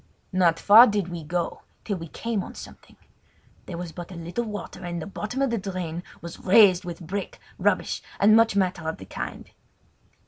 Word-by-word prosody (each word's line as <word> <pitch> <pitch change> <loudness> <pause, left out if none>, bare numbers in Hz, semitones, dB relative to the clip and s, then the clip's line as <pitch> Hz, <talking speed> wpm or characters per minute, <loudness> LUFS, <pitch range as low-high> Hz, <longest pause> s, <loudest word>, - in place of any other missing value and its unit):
Not 175 -3 +3
far 225 +5 +9
did 205 -4 -1
we 170 -2 -6
go 170 +3 -3 0.2
till 200 -3 -2
we 165 -1 -7
came 225 +4 -3
on - - -10
something. - - -12 0.7
There 175 - -6
was 175 -1 -6
but 175 +1 -8
little 175 +6 -4
water, 205 -3 -7
and 175 -1 -4
the 155 - -5
bottom 220 +6 -3
of 270 - +1
the 230 - 0
drain 180 -4 -4 0.2
was 170 0 -8
raised 190 -2 +6
with 175 -1 -7
brick, 195 +4 -5 0.2
rubbish, - - +1 0.2
and 215 +2 +6
much 225 -2 +4
matter 180 -4 0
of 160 - -5
the 95 - -10
kind. - - -7
185 Hz, 185 wpm, -25 LUFS, 170-205 Hz, 0.7 s, far